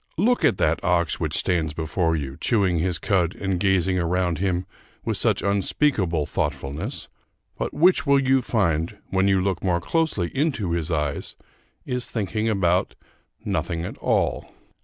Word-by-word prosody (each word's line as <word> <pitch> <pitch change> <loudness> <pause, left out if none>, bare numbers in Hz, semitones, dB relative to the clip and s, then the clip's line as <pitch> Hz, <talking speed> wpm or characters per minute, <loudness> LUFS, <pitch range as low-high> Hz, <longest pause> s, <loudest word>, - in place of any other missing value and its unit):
Look 240 +8 +2
at - - +3
that 80 +2 +1
ox 85 -2 +1
which - - -1
stands 80 -4 0
before 80 +1 0
you, 70 -3 -4
chewing 95 - +1
his 90 +1 0
cud 90 -1 0
and 95 -2 -2
gazing 95 -1 +2
around 90 -1 0
him 90 -1 0 0.4
with - - 0
such - - +1
unspeakable 100 - +1
thoughtfulness 75 - -3 0.5
but - - -3
which 175 0 +3
you 135 -1 +4
will - - 0
find, 95 -6 0
when 95 +1 +2
you 95 -1 +3
look 95 -1 -1
more 90 -2 +1
closely 110 - -1
into 135 - 0
his 85 -1 -1
eyes, 75 -4 -2 0.5
is 125 -1 -2
thinking 110 0 -2
about 95 -3 +1 0.5
nothing 85 +1 -2
at - - -7
all. - - 0
90 Hz, 155 wpm, -24 LUFS, 85-105 Hz, 0.5 s, you